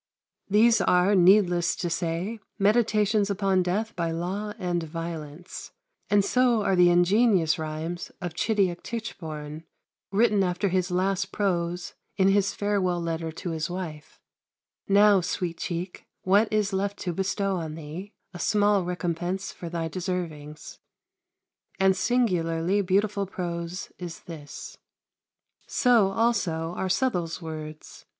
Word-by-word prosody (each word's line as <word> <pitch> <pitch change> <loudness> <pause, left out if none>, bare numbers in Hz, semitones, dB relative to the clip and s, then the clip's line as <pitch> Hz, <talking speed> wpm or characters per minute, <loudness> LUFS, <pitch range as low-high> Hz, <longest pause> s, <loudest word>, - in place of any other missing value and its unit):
These 220 +2 +5
are, 180 +2 +3
needless 180 -2 +4
to 175 - -3
say, 170 +6 -2 0.2
meditations 210 -1 +2
upon 195 -2 +1
death 200 +5 -1
by 170 -1 -1
law 185 +6 -3
and 175 -1 -1
violence; 165 0 -7 0.4
and 205 -1 +4
so 245 -1 +3
are 195 - +2
the 180 -1 +6
ingenious 175 -1 +3
rhymes 160 +2 -4
of 175 -3 -5
Chidiock 190 -2 0
Tichborne, 160 -9 -6 0.5
written 205 -1 +3
after 180 +2 0
his 185 0 0
last 190 +2 0
prose 175 -3 -1 0.2
in 190 -1 +4
his 200 0 +3
farewell 195 -4 0
letter 165 -1 -3
to 170 +2 -5
his 160 +1 -2
wife 170 -5 -7 0.7
"Now, 200 -1 +5
Sweet 175 -1 -3
cheek, 175 +1 -5 0.2
what 205 +4 +3
is 210 -2 +1
left 200 +1 -1
to 175 - -2
bestow 195 +1 -1
on 160 -3 -5
thee, 165 +6 -8 0.2
a 175 - -8
small 205 -2 +3
recompense 180 +1 -3
for 170 - -8
thy 165 -1 -2
deservings" 160 -4 -5 1.0
and 190 0 +4
singularly 185 -4 +1
beautiful 200 +1 +1
prose 175 -1 -5
is 175 -2 -7
this. 155 -5 -9 0.9
So 235 -6 +4
also 185 -7 0
are 190 - -2
Southwell's 180 -7 0
words. 155 -2 -8
180 Hz, 130 wpm, -26 LUFS, 170-200 Hz, 1.0 s, the